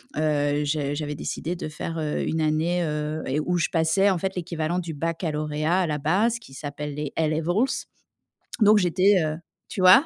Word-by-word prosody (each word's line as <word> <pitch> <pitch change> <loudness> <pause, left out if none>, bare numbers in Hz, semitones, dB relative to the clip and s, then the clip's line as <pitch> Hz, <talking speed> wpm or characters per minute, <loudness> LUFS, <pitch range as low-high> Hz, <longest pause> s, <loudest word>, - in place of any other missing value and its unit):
heu, 150 -1 +1
je 145 -1 -1
j'avais 150 0 -3
décidé 160 +3 -3
de 170 - -5
faire, 165 +2 -5
heu, 150 -1 -1
une 160 - -1
année, 160 +3 +1
heu, 150 0 -2 0.2
où 180 0 +1
je 165 - +1
passais 165 +5 +3
en 190 - +2
fait 190 +2 -3
l'équivalent 170 -1 -2
du 170 -2 -5
baccalauréat 155 +1 -1
à 180 - +1
la 150 -1 -1
base 200 +11 +1
qui 175 -12 -15
s'appelle 145 +1 -5
les 150 -1 -4
A 160 - +2
Levels. 175 - 0 0.8
Donc 210 0 +7
j'étais, 185 +1 +4
heu 155 0 -2 0.3
tu - - -5
vois? 185 - +8
160 Hz, 185 wpm, -25 LUFS, 150-180 Hz, 0.8 s, vois